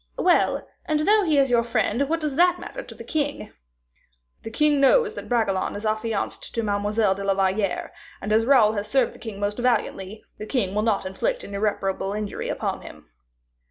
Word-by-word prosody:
"Well, 355 Hz, -1 st, +2 dB, 0.2 s
and 305 Hz, -1 st, 0 dB
though 420 Hz, +7 st, +4 dB
he 315 Hz, -7 st, +2 dB
is 270 Hz, -2 st, +3 dB
your 240 Hz, -1 st, +4 dB
friend, 235 Hz, +3 st, 0 dB
what 330 Hz, +1 st, +1 dB
does 300 Hz, -4 st, -2 dB
that 355 Hz, +3 st, +4 dB
matter -, -, -7 dB
to -, -, -12 dB
the -, -, -9 dB
king?" 290 Hz, -2 st, -3 dB, 0.9 s
"The -, -, -7 dB
king 295 Hz, +4 st, +2 dB
knows 440 Hz, -, +4 dB
that -, -, -8 dB
Bragelonne 220 Hz, -6 st, 0 dB
is 205 Hz, +2 st, -6 dB
affianced 215 Hz, +1 st, -2 dB
to 230 Hz, -, 0 dB
Mademoiselle 205 Hz, 0 st, +1 dB
de 200 Hz, +1 st, -6 dB
la 195 Hz, 0 st, +1 dB
Valliere; 195 Hz, 0 st, 0 dB, 0.3 s
and 210 Hz, +2 st, -2 dB
as 220 Hz, +1 st, +4 dB
Raoul 235 Hz, -6 st, +5 dB
has 205 Hz, -1 st, -3 dB
served 255 Hz, +2 st, +1 dB
the -, -, -15 dB
king 215 Hz, -4 st, -7 dB
most 205 Hz, +2 st, -2 dB
valiantly, 215 Hz, -4 st, -1 dB, 0.2 s
the 215 Hz, -, -6 dB
king 210 Hz, -8 st, -1 dB
will 210 Hz, -, +1 dB
not 215 Hz, -3 st, 0 dB
inflict 190 Hz, 0 st, -2 dB
an 200 Hz, -, -9 dB
irreparable 200 Hz, -1 st, -1 dB
injury 210 Hz, -1 st, -4 dB
upon -, -, -3 dB
him." -, -, -13 dB
220 Hz, 195 wpm, -24 LUFS, 205-280 Hz, 0.9 s, Raoul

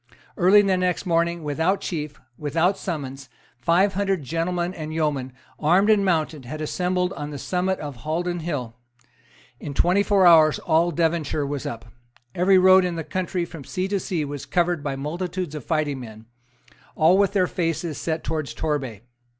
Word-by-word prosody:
Early 195 Hz, +4 st, +5 dB
the 190 Hz, -2 st, +2 dB
next 180 Hz, +1 st, -1 dB
morning, 170 Hz, -1 st, 0 dB
without 160 Hz, +6 st, 0 dB
chief, 150 Hz, -4 st, -5 dB, 0.2 s
without 160 Hz, +7 st, +1 dB
summons, 135 Hz, -8 st, -6 dB, 0.3 s
five 180 Hz, +9 st, +3 dB
hundred 195 Hz, -4 st, 0 dB
gentlemen 175 Hz, +4 st, -2 dB
and 155 Hz, -3 st, -6 dB
yeomen, 150 Hz, -5 st, -1 dB, 0.3 s
armed 185 Hz, +8 st, +4 dB
and 205 Hz, -2 st, +4 dB
mounted, 160 Hz, -5 st, 0 dB
had 155 Hz, +5 st, -6 dB
assembled 180 Hz, +4 st, -1 dB
on 145 Hz, 0 st, -6 dB
the 145 Hz, -, -6 dB
summit 185 Hz, +5 st, -1 dB
of 145 Hz, -4 st, -6 dB
Haldon 175 Hz, +7 st, -2 dB
Hill. 145 Hz, -9 st, -4 dB, 0.9 s
In 140 Hz, -, -7 dB
twenty 180 Hz, +6 st, +3 dB
four 200 Hz, -2 st, +3 dB
hours 160 Hz, -3 st, +7 dB
all 165 Hz, +1 st, +2 dB
Devonshire 160 Hz, -3 st, 0 dB
was 140 Hz, -1 st, -4 dB
up. 115 Hz, 0 st, -6 dB, 0.5 s
Every 190 Hz, +2 st, +4 dB
road 185 Hz, 0 st, +6 dB
in 180 Hz, -1 st, -2 dB
the 165 Hz, -, -3 dB
county 180 Hz, +1 st, -2 dB
from 165 Hz, -4 st, -10 dB
sea 185 Hz, +8 st, -3 dB
to 200 Hz, -1 st, 0 dB
sea 170 Hz, -5 st, -2 dB
was 145 Hz, -1 st, -7 dB
covered 175 Hz, -2 st, +1 dB
by 140 Hz, -2 st, -2 dB
multitudes 175 Hz, +4 st, -4 dB
of 150 Hz, -5 st, -7 dB
fighting 150 Hz, -4 st, -1 dB
men, 110 Hz, -2 st, -10 dB, 0.7 s
all 160 Hz, +3 st, +5 dB
with 200 Hz, -1 st, +2 dB
their 190 Hz, -3 st, +3 dB
faces 165 Hz, -3 st, -2 dB
set 160 Hz, -1 st, -2 dB
towards 155 Hz, -3 st, -3 dB
Torbay. 135 Hz, -9 st, -3 dB
165 Hz, 170 wpm, -23 LUFS, 150-180 Hz, 0.9 s, hours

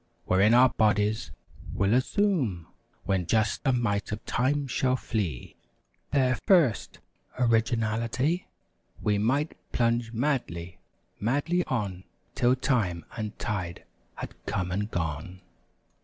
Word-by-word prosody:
Wherein 100 Hz, +5 st, +4 dB
our 125 Hz, +1 st, +7 dB
bodies 105 Hz, 0 st, +1 dB, 0.5 s
will 100 Hz, +2 st, +2 dB
assume. 130 Hz, -, +1 dB, 0.4 s
When 95 Hz, -3 st, 0 dB
just 110 Hz, -2 st, +1 dB
a 135 Hz, -, +3 dB
mite 110 Hz, -5 st, 0 dB
of 105 Hz, +1 st, -5 dB
time 140 Hz, +4 st, +1 dB
shall 130 Hz, 0 st, +1 dB
flee, 100 Hz, -, -3 dB, 0.5 s
195 -, -, -42 dB
Their 130 Hz, -3 st, +3 dB, 0.2 s
first 140 Hz, -11 st, 0 dB, 0.4 s
orginality, 115 Hz, +6 st, +1 dB, 0.5 s
We 105 Hz, -1 st, +1 dB
might 140 Hz, +9 st, +1 dB, 0.2 s
plunge 115 Hz, -1 st, +1 dB
madly, 115 Hz, -, -2 dB, 0.4 s
madly 145 Hz, -, +1 dB
on 100 Hz, -7 st, -3 dB, 0.3 s
'Till 125 Hz, +1 st, +3 dB
time 110 Hz, -, 0 dB
and 110 Hz, -2 st, -5 dB
tide 95 Hz, -5 st, -3 dB, 0.3 s
had -, -, -7 dB
come 90 Hz, -1 st, -1 dB
and 105 Hz, +3 st, -1 dB
gone. 85 Hz, +1 st, -4 dB
115 Hz, 115 wpm, -27 LUFS, 100-130 Hz, 0.5 s, our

